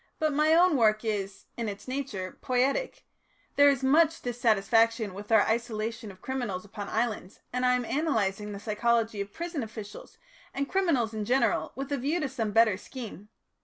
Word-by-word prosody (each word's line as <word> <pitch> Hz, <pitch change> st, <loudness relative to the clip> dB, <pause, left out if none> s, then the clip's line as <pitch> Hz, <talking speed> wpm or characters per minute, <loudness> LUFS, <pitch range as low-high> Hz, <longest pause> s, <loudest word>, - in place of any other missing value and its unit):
"But 310 Hz, -1 st, 0 dB
my 305 Hz, +2 st, +4 dB
own 345 Hz, -3 st, +5 dB
work 215 Hz, -1 st, +3 dB
is, 200 Hz, -3 st, -3 dB
in 230 Hz, -2 st, -2 dB
its 200 Hz, +4 st, -8 dB
nature, 255 Hz, -9 st, -4 dB
poietic; 265 Hz, -, 0 dB, 0.5 s
there 285 Hz, 0 st, +7 dB
is 270 Hz, -2 st, 0 dB
much 315 Hz, +4 st, +3 dB
dissatisfaction 225 Hz, -2 st, +2 dB
with 205 Hz, +3 st, -9 dB
our 220 Hz, -2 st, +6 dB
isolation 225 Hz, -1 st, -2 dB
of 185 Hz, -1 st, -14 dB
criminals 240 Hz, -8 st, -3 dB
upon 205 Hz, 0 st, -7 dB
islands, 215 Hz, -5 st, -2 dB
and 250 Hz, 0 st, -1 dB
I 250 Hz, -, +4 dB
am 250 Hz, -1 st, -1 dB
analysing 215 Hz, -9 st, -1 dB
the 200 Hz, -, -6 dB
psychology 225 Hz, 0 st, 0 dB
of 200 Hz, 0 st, -6 dB
prison 340 Hz, -, -4 dB
officials 215 Hz, -2 st, -9 dB, 0.4 s
and 275 Hz, 0 st, -1 dB
criminals 290 Hz, -, +1 dB
in 215 Hz, -1 st, -3 dB
general 250 Hz, +5 st, +1 dB
with 275 Hz, +1 st, -5 dB
a 285 Hz, -, +1 dB
view 290 Hz, +7 st, 0 dB
to 295 Hz, -4 st, -2 dB
some 230 Hz, -5 st, -2 dB
better 220 Hz, -2 st, +4 dB
scheme. 215 Hz, -2 st, -9 dB
230 Hz, 175 wpm, -28 LUFS, 210-275 Hz, 0.5 s, there